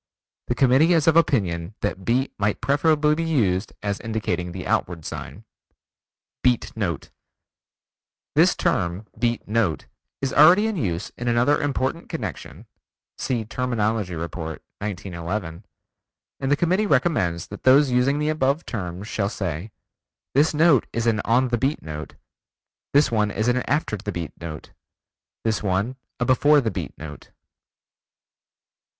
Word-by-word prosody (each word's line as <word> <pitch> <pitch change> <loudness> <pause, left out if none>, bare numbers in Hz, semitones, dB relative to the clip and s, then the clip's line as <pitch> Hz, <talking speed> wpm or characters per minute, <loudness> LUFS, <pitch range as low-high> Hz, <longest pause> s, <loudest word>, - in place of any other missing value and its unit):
The 120 - 0
Committee 135 +7 +4
is 160 -3 +3
of 165 - +4
opinion 100 - +1
that 95 -2 -2
Beat 125 +6 +1
might 100 0 0
preferably 150 +1 +3
be 165 +2 -1
used 110 - 0
as 100 -1 -2
indicating 100 -6 -2
the 90 0 -6
outward 85 -3 -1
sign. - - -7 1.0
Beat 125 -2 +1
Note 90 -9 -3 1.2
This - - +4
term 85 +5 -1
"beat 120 0 0
note" 105 -6 0 0.3
is 135 -1 -2
already 175 +8 +7
in 220 -1 -1
use 95 - -2
in 120 - -3
another 120 +6 +3
important 145 +2 -2
connection 105 - -6 0.5
(see 120 -4 -1
Terminology 110 -5 -1
Report, 80 -1 -5 0.2
1911) 95 -2 -5 0.7
and 135 +1 -1
the - - +6
Committee 185 +6 +2
recommends 125 - +1
that - - -9
those 135 +1 +5
using 125 +3 +2
the 150 +1 0
above 150 0 0
terms 95 -2 -5
shall 100 -3 -1
say: 95 -2 -4 0.6
"This 145 +4 +4
note 155 -5 +4
is 115 0 -2
an 110 -3 +2
on 125 +2 +3
the 120 -1 0
beat 135 +5 -1
note; 75 -1 -7 0.8
this 145 -3 +4
one 105 -2 +2
is 110 +2 -1
an 125 +1 +3
after 145 -6 0
the 105 +1 -5
beat 85 -4 -5
note; 80 -3 -7 0.7
this 110 -1 0
one 100 +5 0 0.2
a 125 - +1
before 145 +4 +5
the 115 -5 -1
beat 90 -6 -6
note." 75 -1 -10
115 Hz, 145 wpm, -23 LUFS, 95-140 Hz, 1.2 s, already